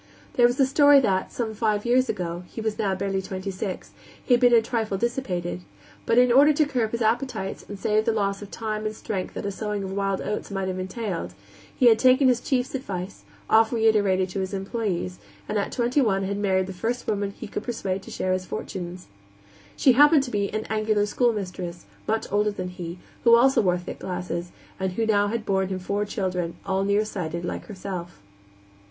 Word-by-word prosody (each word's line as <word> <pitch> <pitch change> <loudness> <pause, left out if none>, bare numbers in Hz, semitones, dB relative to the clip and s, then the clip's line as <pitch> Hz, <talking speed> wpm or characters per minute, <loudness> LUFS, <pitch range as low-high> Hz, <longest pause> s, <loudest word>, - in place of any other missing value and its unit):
There 240 -1 +5
was 245 +3 -2
a 270 - +6
story 285 +1 +6
that, 190 -6 0
some 225 -3 -3
five 215 -1 0
years 255 +2 +3
ago 175 -1 -3
he - - -9
was 220 -1 -2
now 195 -3 +1
barely 195 0 -1
twenty 190 +1 -5
six 190 0 -5 0.3
he 250 - +3
had 245 - +4
been 245 -1 +6
a 235 - +7
trifle 225 -3 -2
dissipated, 190 - -2 0.5
but 230 - +3
in 250 0 +6
order 280 +5 +7
to 300 +1 +3
curb 245 -6 0
his 235 +1 -2
appetites 225 -3 -1
and 205 - -6
save 215 +2 +1
the - - +3
loss 200 -2 -1
of 205 - -8
time 215 -1 -3
and 215 - -5
strength 195 -4 -4
that - - -4
a 200 - -1
sowing 210 0 -3
of 190 - -5
wild 195 0 -1
oats 210 - -3
might 195 -1 -2
have 185 0 -3
entailed, 185 - -4 0.4
he 255 - +2
had 225 -2 +7
taken 260 +1 +5
his 245 -1 +2
chief's 260 -2 -1
advice, 195 -9 -5 0.2
oft 220 0 +5
reiterated 210 -5 +3
to 190 - -4
his 190 +1 -3
employees, 190 - -3 0.3
and 210 - 0
at 200 - -2
twenty 245 +4 +1
one 195 -6 +1
had 200 +1 -2
married 190 -2 +2
the 190 - -7
first 230 +7 -3
woman 205 -1 -1
whom 200 - -14
he - - -7
could 205 - -4
persuade 195 -6 -3
to - - -12
share 185 - -1
his 185 0 -1
fortunes. 180 -1 -6 0.7
She 265 - +5
happened 290 +3 +6
to 250 - -6
be 200 -1 0
an 215 0 -3
angular 215 -1 +1
schoolmistress, 190 -6 -2 0.2
much 220 +1 0
older 210 +1 +2
than 185 -3 -4
he, 175 -1 -7 0.3
who 235 -1 +7
also 265 +2 +5
wore 180 -3 +2
thick 175 - -8
glasses, 180 -1 -4 0.3
and 190 -1 -1
who 225 - -1
had 220 - -1
now 205 +2 +2
borne 195 -3 0
him 190 0 -3
four 200 +3 -2
children, 180 -4 -2
all 190 0 0
nearsighted, 195 -5 -1
like - - -4
herself. 185 - -6
205 Hz, 210 wpm, -25 LUFS, 190-230 Hz, 0.7 s, a